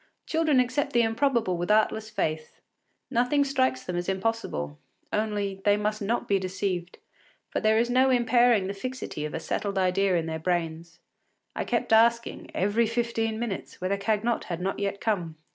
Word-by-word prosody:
Children 315 -4 +2
accept 250 +3 0
the 235 0 +4
improbable 225 -4 +1
with 175 +2 -3
artless 220 0 +2
faith; 155 -7 -3 0.5
nothing 250 +4 +3
strikes 260 -2 0
them 180 - -4
as 175 +1 -2
impossible; 190 - -2 0.3
only, 205 -2 -1
they 205 0 +4
must 210 +1 -1
not 225 +4 -1
be 200 -1 +2
deceived, 185 -1 -3 0.5
for - - 0
there 220 0 +3
is 235 +1 +3
no 255 +2 +3
impairing 240 -4 +4
the 195 - -3
fixity 250 - -5
of 150 - -5
a - - -2
settled 200 +4 -3
idea 190 0 +2
in 165 - -1
their 160 0 -3
brains. 165 -1 -2 0.6
I - - -2
kept - - 0
asking, 235 +1 +3
every 205 +4 +2
fifteen 230 -1 -1
minutes, 225 -4 -5
whether 185 +2 0
Cagnotte 215 +3 0
had 170 -2 -4
not 190 +2 -2
yet 200 0 -2
come. 175 -8 -1
210 Hz, 170 wpm, -27 LUFS, 185-235 Hz, 0.6 s, the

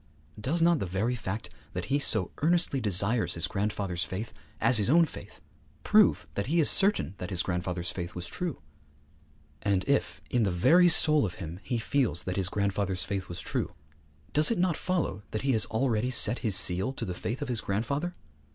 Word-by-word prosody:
Does 155 +10 0
not 170 -2 +4
the 95 - -3
very 100 +7 -1
fact 110 -2 -5 0.2
that - - -4
he 145 - +3
so 110 -9 +2
earnestly 165 -4 +1
desires 105 +3 +1
his 85 -1 -1
grandfather's 100 -1 -2
faith 105 +5 -6 0.3
as 130 -4 +4
his 105 - 0
own 165 +4 +5
faith - - -11 0.4
prove - - +4
that 100 - -3
he 165 +5 +1
is 155 - +7
certain 195 - +2
that 90 - -5
his 90 -3 -1
grandfather's 90 -1 -3
faith 85 -1 -6
was 90 -1 -5
true? 170 - -5 1.0
And 100 -1 0
if, 140 0 0
in 120 - +2
the 105 - +2
very 170 - +4
soul 155 -2 +5
of 90 -4 -3
him, 85 0 -7
he 120 - -3
feels 115 - 0
that 90 - -4
his 95 -2 0
grandfather's 100 -2 -1
faith 95 -2 -4
was 85 0 -6
true, - - -3 0.6
does 150 +1 +5
it 230 - 0
not 175 -2 +1
follow 170 - -2
that 110 - -4
he 135 - +1
has 110 -4 +3
already 115 0 0
set 120 -1 +4
his 110 -5 0
seal 90 +7 +2
to - - -5
the 90 - -4
faith 115 +10 -4
of - - -6
his 120 -3 -2
grandfather? 140 - -2
110 Hz, 195 wpm, -28 LUFS, 95-140 Hz, 1.0 s, is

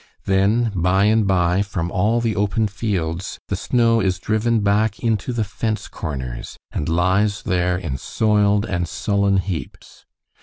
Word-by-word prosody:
Then, 105 +4 +2
by 95 +2 +2
and 110 -1 +3
by, 90 0 +2
from 90 -4 -3
all 110 +5 +1
the 115 -2 0
open 105 +2 +1
fields 95 -4 -3
the 100 - 0
snow 115 +3 +2
is 95 -3 +1
driven 110 +4 0
back 105 +1 +1
into 115 0 0
the 115 -2 0
fence 110 +2 -3
corners, 65 -5 -6
and 75 - -3
lies 95 +5 +1
there 90 0 +1
in 80 -7 -4
soiled 105 - +1
and 85 -4 -2
sullen 100 +1 +1
heaps. 95 -3 -6
100 Hz, 150 wpm, -21 LUFS, 90-110 Hz, -, and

